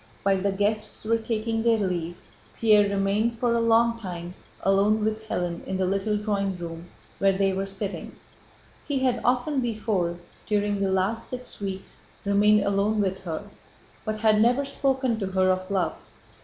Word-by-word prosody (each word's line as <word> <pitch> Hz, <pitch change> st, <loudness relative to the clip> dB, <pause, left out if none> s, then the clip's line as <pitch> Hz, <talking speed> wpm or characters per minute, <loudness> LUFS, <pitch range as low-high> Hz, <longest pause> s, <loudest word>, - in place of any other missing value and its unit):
While 195 Hz, -1 st, +2 dB
the 200 Hz, +1 st, +1 dB
guests 210 Hz, +3 st, -1 dB
were 230 Hz, +1 st, +2 dB
taking 225 Hz, 0 st, -1 dB
their 230 Hz, 0 st, +3 dB
leave 175 Hz, -4 st, -2 dB, 0.4 s
Pierre 210 Hz, -2 st, +5 dB
remained 200 Hz, +4 st, +1 dB
for 240 Hz, 0 st, +1 dB
a 235 Hz, -, +2 dB
long 230 Hz, 0 st, +3 dB
time 175 Hz, -4 st, -6 dB, 0.3 s
alone 205 Hz, +2 st, +3 dB
with 220 Hz, 0 st, -2 dB
Hélène 175 Hz, -1 st, -2 dB
in 190 Hz, -, -2 dB
the 190 Hz, -, +1 dB
little 195 Hz, +3 st, 0 dB
drawing 200 Hz, -3 st, -1 dB
room 170 Hz, 0 st, -7 dB, 0.3 s
where 195 Hz, -1 st, +3 dB
they 195 Hz, -1 st, +2 dB
were 195 Hz, +1 st, -2 dB
sitting. 195 Hz, +1 st, -5 dB, 0.7 s
He 285 Hz, -2 st, 0 dB
had 255 Hz, -3 st, +1 dB
often 255 Hz, +3 st, +1 dB
before, 210 Hz, -7 st, -1 dB, 0.3 s
during 205 Hz, -1 st, +1 dB
the 195 Hz, -, +1 dB
last 190 Hz, +5 st, 0 dB
six 250 Hz, -1 st, -6 dB
weeks, 195 Hz, -1 st, -5 dB, 0.3 s
remained 205 Hz, +1 st, +4 dB
alone 200 Hz, +2 st, +1 dB
with 190 Hz, -1 st, 0 dB
her, 160 Hz, -2 st, -3 dB, 0.6 s
but 215 Hz, -1 st, -3 dB
had 215 Hz, -1 st, +4 dB
never 245 Hz, +5 st, +3 dB
spoken 265 Hz, -4 st, 0 dB
to 195 Hz, -, -2 dB
her 185 Hz, 0 st, +2 dB
of 185 Hz, +1 st, -2 dB
love. 195 Hz, -2 st, 0 dB
205 Hz, 170 wpm, -26 LUFS, 190-225 Hz, 0.7 s, Pierre